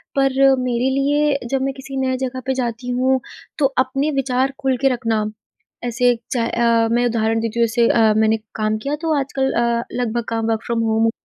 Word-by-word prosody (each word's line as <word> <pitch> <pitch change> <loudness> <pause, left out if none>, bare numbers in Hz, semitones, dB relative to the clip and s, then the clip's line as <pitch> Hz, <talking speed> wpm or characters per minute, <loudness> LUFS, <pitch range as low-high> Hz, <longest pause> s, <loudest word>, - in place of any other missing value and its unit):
पर 270 -1 +2 0.3
मेरे 250 +1 0
लिए 285 +2 +1
जब 270 -1 0
मैं 270 0 -1
किसी 270 0 -7
नए 260 0 0
जगह 260 0 -3
पे 265 - 0
जाती 240 +1 -4
हूँ 260 +1 +2 0.4
तो 290 - +2 0.2
अपने 275 +4 -1
विचार 260 +1 0
खुल 265 -2 0
के 270 - +4
रखना 225 -3 -1 0.6
ऐसे 245 0 +2 0.2
चाह 235 -2 0
अ, 230 -1 +2
मैं 240 +1 +2
उदाहरण 225 -1 +1
देती 230 +1 -3
हूँ 230 - +4
जैसे 235 +1 +2
अ, 220 -2 +4
मैंने 220 0 +3 0.2
काम 215 0 0
किया 285 +2 -1
तो 325 -1 0
आजकल 265 -1 -1
अ, 235 0 +1 0.2
लगभग 235 0 -1
काम 225 0 -1
वर्क 220 0 -2
फ़्रॉम 230 -1 0
होम 225 +1 +2
245 Hz, 195 wpm, -20 LUFS, 230-265 Hz, 0.6 s, के